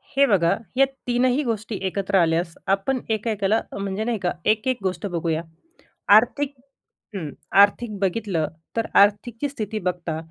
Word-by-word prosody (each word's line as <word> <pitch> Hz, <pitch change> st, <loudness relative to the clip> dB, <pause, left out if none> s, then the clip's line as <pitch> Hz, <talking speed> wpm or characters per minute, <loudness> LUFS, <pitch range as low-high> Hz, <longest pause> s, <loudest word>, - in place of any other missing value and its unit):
हे 280 Hz, +1 st, +6 dB
बघा. 180 Hz, -7 st, +3 dB, 0.2 s
या 275 Hz, -, +6 dB, 0.2 s
तीनही 250 Hz, +3 st, +2 dB
गोष्टी 220 Hz, -3 st, -3 dB
एकत्र 195 Hz, +1 st, -2 dB
आल्यास 165 Hz, 0 st, +1 dB
आपण 200 Hz, +7 st, +1 dB
एका-एकाला 220 Hz, -1 st, 0 dB, 0.2 s
म्हणजे 200 Hz, +1 st, -3 dB
नाही 235 Hz, 0 st, -1 dB
का 180 Hz, -2 st, 0 dB, 0.2 s
एक-एक 230 Hz, +4 st, 0 dB
गोष्ट 190 Hz, +2 st, -2 dB
बघूया. 165 Hz, -3 st, -1 dB, 0.7 s
आर्थिक 270 Hz, +6 st, +3 dB, 0.6 s
हं, 165 Hz, -6 st, -4 dB, 0.3 s
आर्थिक 205 Hz, +1 st, +2 dB
बघितलं 190 Hz, -4 st, 0 dB, 0.3 s
तर 225 Hz, -, +1 dB
आर्थिकची 225 Hz, +6 st, +3 dB
स्थिती 220 Hz, -5 st, -4 dB
बघता, 170 Hz, -3 st, -2 dB
205 Hz, 135 wpm, -23 LUFS, 185-235 Hz, 0.7 s, हे